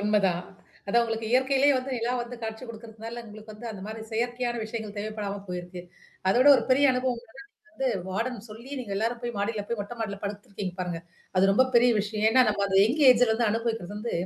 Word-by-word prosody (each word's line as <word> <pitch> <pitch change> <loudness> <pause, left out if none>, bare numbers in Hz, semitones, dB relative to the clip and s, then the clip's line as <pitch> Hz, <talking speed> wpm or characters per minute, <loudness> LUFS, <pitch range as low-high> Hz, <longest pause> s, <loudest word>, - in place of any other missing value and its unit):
உன்மைதான். 195 -4 +2 0.4
அதான் 235 +4 +3
உங்களுக்கு 225 -1 -2
இயற்கையிலேயே 265 +2 +4
வந்து 255 +1 -3
நிலா 235 +2 -1
வந்து 245 +1 -8
காட்சி 220 +2 -5
குடுக்கறதுனால, 230 0 -8
உங்களுக்கு 215 +1 -11
வந்து 215 +3 -9
அந்த 200 -3 -8
மாரியானா 220 +1 -7
செயற்கையான 240 +1 -1
விஷயங்கள் 215 -2 -6
தேவைப்படாம 205 -1 -4
போயிருக்கு. 180 0 -6 0.5
அத 190 - +4
விட 285 - +7
ஒரு - - 0
பெரிய 275 +3 +5
அனுபவம் 250 -2 -1 0.5
வந்து 270 -5 -1 0.2
வார்டன் 230 +4 -2
சொல்லி, 235 +5 -11
நீங்க 220 -6 -5
எல்லாரும் 230 +3 -1
போய் 240 -1 -3
மாடில 205 0 -1
போய் 235 -2 -2
மொட்டை 205 +4 -6
மாடில 200 -3 -2
படுத்துருக்கீங்க 200 -2 -5
பாருங்க. 175 -2 -3 0.4
அது 195 +1 +5
ரொம்ப 260 +6 +5
பெரிய 245 +1 +6
விஷயம். 210 +1 -2
ஏன்னா, 255 +2 +6
நம்ம 205 -1 +1
அந்த 195 0 +3
எங் 265 +8 -1
ஏஜ்ல 235 -2 +4
அனுபவிக்கிறது 225 -4 -2
வந்து 230 +3 -4
220 Hz, 190 wpm, -27 LUFS, 205-240 Hz, 0.5 s, விட